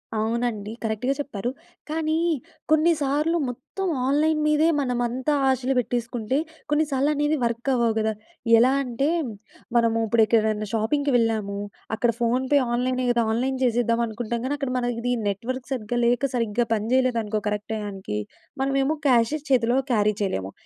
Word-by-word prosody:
అవునండి 220 -1 -1
కరెక్ట్‌గా 225 +5 0
చెప్పారు. 245 -5 -3 0.4
కానీ 315 0 0 0.5
కొన్నిసార్లు 310 0 +2
మొత్తం 260 +10 -5 0.2
ఆన్‌లైన్ 305 +2 +2
మీదే 305 +1 +3
మనమంతా 250 +2 -1 0.2
ఆశలు 260 0 +1
పెట్టేసుకుంటే 240 +1 -2 0.3
కొన్నిసార్లు 295 -2 +1
అనేది 295 +1 +1
వర్క్ 235 +3 -2
అవ్వవు 235 -2 +2
గద! 220 0 +1 0.5
ఎలా 255 +3 +5
అంటే, 270 +4 -1 0.7
మనము 230 -1 +3
ఇప్పుడు 225 0 +4
ఎక్కడైనా 215 -1 +1
షాపింగ్‌కి 280 +6 +1
వెళ్ళాము, 215 -3 0 0.4
అక్కడ 235 +1 +2
ఫోన్‌పే 260 +4 +2
ఆన్‌లైన్ 255 +1 0
కదా 235 -1 +2
ఆన్‌లైన్ 260 +3 -1
చేసేద్దాం 235 -1 +2
అనుకుంటాం 230 +1 -3
కానీ 285 +2 0
అక్కడ 275 -3 -3
మన 245 -1 0
ఇది 245 +1 0
నెట్వర్క్ 245 +6 -3
సరిగ్గా 240 0 -2
లేక 245 +3 +2
సరిగ్గా 230 0 0
పని 215 0 -1
చేయలేదనుకో 230 -5 +1
కరెక్ట్ 210 +1 -4
టైయానికీ. 195 - -4 0.4
మనమేమో 275 +2 +1
క్యాషె 245 +4 +3
చేతిలో 245 0 +3
క్యారీ 210 -2 +2
చేయలేము. 95 - -2
245 Hz, 135 wpm, -24 LUFS, 225-270 Hz, 0.7 s, ఎలా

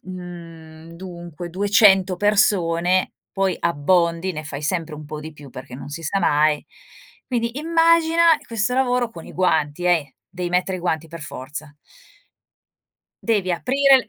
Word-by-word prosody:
mhmm, 165 -3 -10
dunque 175 -1 -8
200 195 0 +4
persone, 185 -3 +2 0.2
poi 195 -2 0
abbondi, 170 +3 +1
ne 155 -2 -5
fai 145 0 -6
sempre 165 0 -2
un 150 0 -9
po' 150 +1 -7
di 155 0 -9
più, 145 -2 -13
perché 125 0 -10
non 140 +2 -8
si 155 +3 -6
sa 180 +6 -1
mai. 150 -3 +2 0.6
Quindi 240 +1 -2
immagina 330 +1 +3 0.2
questo 230 0 -1
lavoro, 250 -2 +1
con 165 -7 -11
i - - -11
guanti 160 -2 0
eh, 160 -6 +1 0.2
dei 180 -1 -4
mettere 180 +1 0
guanti 165 -2 -2
per 165 0 -9
forza. 145 +2 -8 1.5
Devi 205 -5 +1
aprire 270 +9 +4
175 Hz, 140 wpm, -22 LUFS, 160-205 Hz, 1.5 s, 200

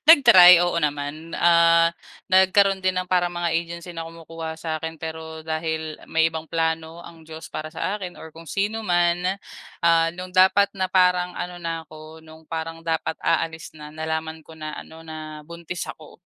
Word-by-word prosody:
Nag-try 185 - +9
oo 175 -1 0
naman, 150 +2 -3
ah, 170 -1 +5 0.4
nagkaroon 190 +1 +4
din 185 0 0
ng 185 0 -2
parang 180 -1 +2
mga 175 -1 -1
agency 170 +1 -3
na 165 -1 -6
kumukuha 165 -1 -8
sa'kin 160 0 -4
pero 160 0 -7
dahil 160 -1 -3
may 160 0 +2
ibang 160 0 -6
plano 160 +1 -2
ang 165 -2 -14
Diyos 160 0 -10
para 155 0 -5
sa 200 +5 -2
akin 180 -3 -7
or 160 - -11
kung 165 +1 -13
sino 205 +6 -1
man. 175 +1 +1 0.5
Ah, 165 -1 +4
no'ng 180 0 -8
dapat 190 +2 +4
na 190 -1 -2
parang 180 -1 +2
ano 175 0 -5
na 165 -1 -4
ako, 155 0 -13
no'ng 160 0 -15
parang 165 0 -5
dapat 165 -1 -2
aalis 165 -1 -1
na, 150 0 -10
nalaman 160 0 -4
ko 160 +1 -15
na 155 -1 -6
ano 160 0 -13
na 155 -1 -8
buntis 170 +2 -6
ako. 155 - -14
165 Hz, 175 wpm, -23 LUFS, 160-175 Hz, 0.5 s, Nag-try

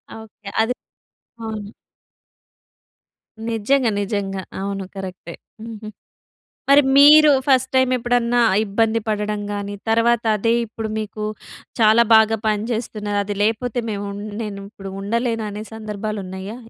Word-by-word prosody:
Okay. 215 -2 -11
అది 235 +3 +1 0.7
అవునా? 215 -1 -6 1.8
నిజంగా. 230 +3 +1
నిజంగా. 195 -2 -3 0.2
అవును. 195 -1 -3
కరెక్టే. 185 -3 -7 0.3
హుహు. 215 -2 -8 0.8
మరి 285 +1 +7
మీరు 300 +1 +8 0.2
ఫస్ట్ 260 -1 +3
టైమ్ 260 -1 +3
ఎప్పుడన్నా 240 0 +1 0.3
ఇబ్బంది 225 +2 +1
పడడం 210 0 -1
గాని, 205 0 -4
తర్వాత 230 +1 +3
అదే 230 +3 +1
ఇప్పుడు 220 0 -6
మీకు 215 0 -5 0.6
చాలా 220 +2 +6
బాగా 220 0 +5
పనిచేస్తున్నాది. 215 -1 -2
అది 205 0 -4
లేకపోతే 230 +2 0
మేము 200 -1 -4
ఉన్ 205 +1 -7 0.2
నేను 200 -2 -6
ఇప్పుడు 195 -3 -9
ఉండలేను 230 +2 -1
అనే 210 +1 -6
సందర్భాలు 215 -1 -5
ఉన్నాయా? 190 +4 -7
215 Hz, 120 wpm, -21 LUFS, 205-230 Hz, 1.8 s, మీరు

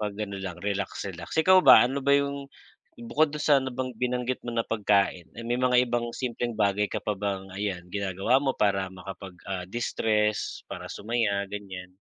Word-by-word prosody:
'pag 105 -1 -2
ano 100 -1 -5
lang 90 -3 -5
relax-relax. 100 - -4
Ikaw 185 +3 +6
ba, 130 -4 +10
ano 140 +2 -2
ba 140 - +4
yung 140 0 -1 0.6
bukod 145 +6 +1
dun 150 - -4
sa 145 -2 +6
nabang 130 -1 -4
binanggit 125 0 -1
mo 120 - -3
na 115 - +2
pagkain, 100 -5 +1
ay 115 - -6
may 120 +1 0
mga 125 0 +4
ibang 120 0 -1
simpleng 120 -1 -2
bagay 105 -1 +2
ka - - -2
pa 105 - -1
bang, 95 -1 -3
ayan, 100 -3 -2
ginagawa 100 +4 +1
mo 135 -2 +1
para 95 -2 +1
makapag, 95 0 -9 0.2
ah, 90 -2 -3
distress 105 -1 0
para - - -6
sumaya 105 -2 0
ganyan? 95 -3 -8
105 Hz, 180 wpm, -27 LUFS, 100-125 Hz, 0.6 s, ba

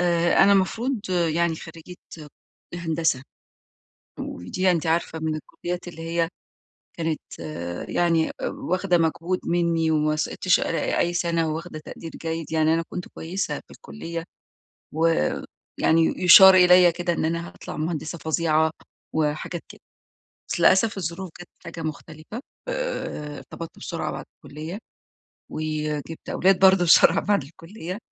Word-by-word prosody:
آآ، 170 0 +3
أنا 200 +1 +6
مفروض 230 +7 +1
يعني 170 -1 +1
خريجة 165 +2 -11 0.8
هندسة، 165 -5 0 1.0
ودي 185 - -1
أنتِ 165 -1 -1
عارفة 165 0 0
من 160 0 -1
الكليات 175 +3 -6
اللي 165 -2 -8
هي 165 0 -1 0.7
كانت 160 -2 -2 0.7
يعني 165 -2 +2
واخدة 180 0 0
مجهود 165 +2 0
مِنّي، 170 -2 +1
وما 155 0 +2
سقطتش 170 +3 +1
أ 165 - -1
أي 175 - +1
سنة، 170 -1 0
وواخدة 155 0 -6
تقدير 165 +1 -9
جيد، 165 -1 -4
يعني 160 0 +3
أنا 165 0 +1
كنت 180 - -6
كويسة 180 +4 -4
في - - -14
الكلية. 165 - -7 0.7
ويعني 165 - +1
يُشار 190 +2 +10
إليَّ 180 -1 +7
كده 175 +1 -1
إن 165 - -1
أنا 170 +1 -2
هاطلع - - -9
مهندسة 155 +1 -3
فظيعة 160 0 +1 0.4
وحاجات 155 +2 -1
كده. - - -14 0.7
بس - - -2
للأسف، 200 +2 +4
الظروف 175 +1 -4
جات 175 - -10 0.2
حاجة 165 - -7
مختلفة. 155 - -7 0.3
آآ، - - -4
ارتبطت 165 -1 -9
بسرعة - - -4
بعد - - -6 0.2
الكلية، 160 +7 -7 0.7
وجِبت 155 0 -4
أولاد 190 0 +3
برضه 190 -1 +6
بسرعة 165 - +6
بعد 205 -5 +1
الكلية. 165 +5 -8
165 Hz, 130 wpm, -24 LUFS, 160-180 Hz, 1.0 s, يُشار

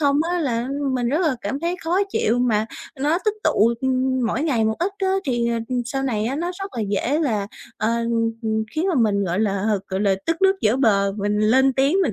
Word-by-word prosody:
không 285 -2 +3
á 355 - 0
là 245 -5 -1 0.3
mình 245 -2 0
rất 295 +7 +1
là 315 -7 +2
cảm 275 - -3
thấy 340 +2 -1
khó 345 +3 +1
chịu 240 - +1
mà 220 -3 +1 0.3
nó 300 +5 +2
tích 425 -1 +1
tụ, 225 +3 +3
ừm, 260 -1 +1
mỗi 235 +5 -1
ngày 260 -8 +1
một 220 0 +1
ít 360 +4 -1
á 385 - 0 0.2
thì 240 -3 0 0.4
sau 270 +3 -3
này 225 -6 -1
á 255 +5 -2
nó 345 +3 -2
rất 390 - -5
là 230 - -1
dễ 235 +8 0
là, 220 -11 0 0.3
ờ, 215 - 0
ừm, 230 -1 0
ừm, 220 -1 0
khiến 315 +4 0
mà 365 - +1
mình, 210 -6 +2
gọi 180 +2 -1
là, 200 -2 0 0.2
gọi 190 0 -2
là, 200 -2 +3
tức 330 - +1
nước 385 0 +4
vỡ 220 +3 +3
bờ 200 -6 +2
mình 205 +1 -1
lên 260 +6 +4
tiếng 275 +6 +2
mình 290 - 0
245 Hz, 235 wpm, -22 LUFS, 220-295 Hz, 0.4 s, nước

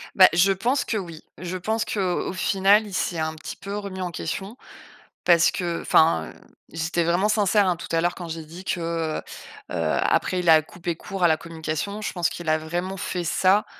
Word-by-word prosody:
Bah 185 -1 +8
je 180 +3 +4
pense 245 +9 0
que - - -2
oui. 170 -5 -7 0.2
Je 180 +1 -4
pense 220 +5 -1
qu'au 185 -4 -1
au - - -4
final, 195 +3 +3
il 200 - -10
s'est 180 -1 -1
un 160 0 -1
petit 155 - -8
peu 200 +1 -6
remis 200 -2 -6
en 180 -1 -3
question 195 +8 -5 0.7
parce 170 -1 +6
que 170 -2 -3
enfin, 80 - +3
heu, - - -22 0.4
j'étais 165 +1 -1
vraiment 175 +5 +2
sincère 210 -2 +3
hein, 180 - +1
tout 170 - -9
à 165 - +3
l'heure 175 +1 0
quand 175 -2 -7
j'ai 160 0 -6
dit 175 +4 -10
que, 180 - -2 0.4
heu - - -21 0.5
heu, - - -5 0.3
après 185 - +1
il 175 - -2
a 160 -1 +7
coupé 170 +1 -5
court 190 0 -4
à - - +7
la 160 - +3
communication. 165 +5 -4
Je 215 - -3
pense 175 -2 +1
qu'il 170 -2 -7
a 155 - +4
vraiment 175 +5 -4
fait 180 -1 -3
ça 190 +4 +3
180 Hz, 215 wpm, -24 LUFS, 165-195 Hz, 0.7 s, Bah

